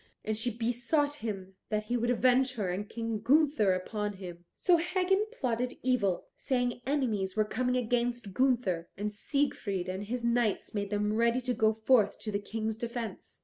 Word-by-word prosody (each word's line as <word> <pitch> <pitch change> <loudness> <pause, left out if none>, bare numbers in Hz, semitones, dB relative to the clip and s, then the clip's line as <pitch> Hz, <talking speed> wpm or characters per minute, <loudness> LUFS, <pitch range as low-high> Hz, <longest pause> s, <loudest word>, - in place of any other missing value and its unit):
And 215 - 0
she 225 +3 -1
besought 245 +6 0
him 195 -4 -4 0.2
that 215 -1 0
he 235 +3 -2
would 240 0 0
avenge 255 +2 +3
her 200 -6 -1
and 205 +3 -4
King 230 -1 -3
Gunther 275 -3 +4
upon 210 +3 -2
him. 175 -3 -9
So 355 -2 +4
Hagan 370 +4 +1
plotted 250 - -2
evil, 220 -8 +1
saying 245 -2 -1
enemies 220 -10 0
were 215 -1 +3
coming 250 +3 0
against 240 -3 -1
Gunther, 230 -9 +1
and 210 +1 -2
Siegfried 205 -7 -1
and 190 +2 -4
his 240 +3 -3
knights 235 -3 +1
made 200 -1 -2
them 210 0 0
ready 235 +2 +3
to 250 0 -1
go 220 -1 +3
forth 220 -2 +3
to 215 - -3
the 200 - 0
King's 220 +1 -3
defence. 235 -3 -5
230 Hz, 175 wpm, -30 LUFS, 205-250 Hz, 0.2 s, Gunther